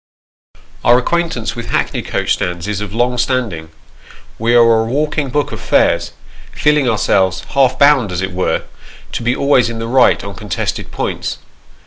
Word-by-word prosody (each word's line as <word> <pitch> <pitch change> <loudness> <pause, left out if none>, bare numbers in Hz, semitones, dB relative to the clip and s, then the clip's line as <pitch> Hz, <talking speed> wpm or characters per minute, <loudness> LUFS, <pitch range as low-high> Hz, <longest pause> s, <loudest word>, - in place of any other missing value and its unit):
Our 120 - +5
acquaintance 165 -3 -1
with 115 - -6
hackney - - -1
coach - - -1
stands 90 0 -3
is 105 -1 -2
of 105 -2 -5
long 120 +2 0
standing. 115 -12 -1 0.7
We 115 +2 +2
are 115 -1 +5
a - - -2
walking 145 +3 -1
book 145 +2 -1
of - - -6
fares, - - +1 0.4
feeling 150 -3 +2
ourselves, 95 -4 +1
half 130 -2 +2
bound, 140 -8 +4
as 90 +1 -2
it 95 - -3
were, 90 0 -1 0.5
to - - -4
be 120 +1 0
always 130 -4 +2
in 115 - -5
the 115 - -4
right 125 +2 +3
on 100 - -6
contested 105 -2 -4
points. - - -3
120 Hz, 165 wpm, -16 LUFS, 105-130 Hz, 0.7 s, Our